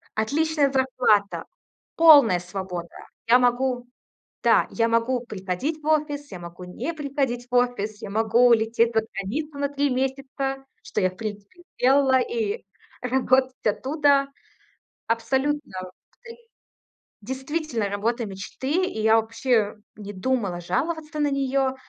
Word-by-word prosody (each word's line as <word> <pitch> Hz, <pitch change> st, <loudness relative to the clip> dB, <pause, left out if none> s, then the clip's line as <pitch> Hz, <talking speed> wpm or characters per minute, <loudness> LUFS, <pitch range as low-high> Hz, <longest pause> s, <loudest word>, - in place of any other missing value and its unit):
отличная 290 Hz, +5 st, +1 dB
зарплата, 255 Hz, -6 st, +1 dB, 0.5 s
полная 290 Hz, -, +7 dB
свобода. 180 Hz, -1 st, -6 dB, 0.4 s
Я 245 Hz, +2 st, +6 dB
могу 245 Hz, 0 st, +1 dB, 0.6 s
да, -, -, +4 dB
я 230 Hz, 0 st, +1 dB
могу 230 Hz, +2 st, +1 dB
приходить 215 Hz, -, -4 dB
в 295 Hz, -, -11 dB
офис, 295 Hz, -3 st, 0 dB
я 185 Hz, -, -7 dB
могу 175 Hz, +1 st, -10 dB
не 180 Hz, -, -5 dB
приходить 275 Hz, -5 st, -2 dB
в -, -, -5 dB
офис, 245 Hz, -4 st, 0 dB
я -, -, -6 dB
могу 225 Hz, +3 st, +3 dB
улететь 230 Hz, 0 st, +3 dB
за 220 Hz, -, +4 dB
границу 280 Hz, +10 st, -4 dB
на 280 Hz, 0 st, 0 dB
3 285 Hz, 0 st, 0 dB
месяца, 270 Hz, +1 st, -2 dB, 0.2 s
что -, -, -3 dB
я, 185 Hz, -, +3 dB
в 185 Hz, -, -18 dB
принципе, 210 Hz, -, -7 dB
и -, -, -19 dB
сделала, 265 Hz, 0 st, +4 dB
и 450 Hz, -, -2 dB, 0.4 s
работать 260 Hz, +1 st, +2 dB
оттуда. 275 Hz, +5 st, +2 dB, 0.8 s
Абсолютно, 265 Hz, +5 st, -1 dB, 0.5 s
ты 465 Hz, -1 st, -11 dB, 0.9 s
Действительно, 265 Hz, -1 st, -3 dB
работа 225 Hz, +4 st, -1 dB
мечты. 260 Hz, -, -2 dB
И 295 Hz, -, -5 dB
я 220 Hz, +1 st, +5 dB
вообще 225 Hz, -1 st, +1 dB, 0.2 s
не 205 Hz, -1 st, -8 dB
думала 195 Hz, -3 st, -1 dB
жаловаться 305 Hz, -, -2 dB
на 295 Hz, -1 st, +2 dB
нее. 270 Hz, -1 st, 0 dB
255 Hz, 130 wpm, -24 LUFS, 215-285 Hz, 0.9 s, полная